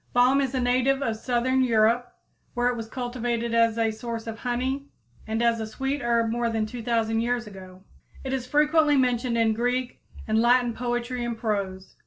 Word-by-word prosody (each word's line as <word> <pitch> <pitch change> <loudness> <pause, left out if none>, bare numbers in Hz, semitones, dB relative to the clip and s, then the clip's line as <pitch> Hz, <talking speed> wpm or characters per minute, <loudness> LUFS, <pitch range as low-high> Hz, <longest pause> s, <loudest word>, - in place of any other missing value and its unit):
Balm 255 +3 +4
is 265 -1 -2
a - - +1
native 255 +2 +2
of 225 -4 -1
southern 250 +3 0
Europe, 235 +1 +2 0.4
where 245 0 +2
it 250 - -1
was 225 -1 -6
cultivated 240 -1 -3
as 230 -1 +3
a 225 -1 +1
source 230 0 -6
of 225 -1 -6
honey 260 +3 -2 0.4
and 220 +2 -1
as 235 -1 +2
a 220 - -3
sweet 270 +5 -3
herb 235 -1 +1
more 235 0 0
than 225 -1 -1
2,000 225 -1 -1
years 240 0 -1
ago. 190 -2 -12 0.4
It 265 -1 -3
is 255 -2 -3
frequently 300 +1 +3
mentioned 245 -2 +1
in 225 -1 +3
Greek 245 +2 -2 0.3
and 220 0 +2
Latin 245 0 +3
poetry 240 +1 -3
and 235 -1 -3
prose. 200 -4 -3
240 Hz, 185 wpm, -25 LUFS, 225-250 Hz, 0.4 s, Balm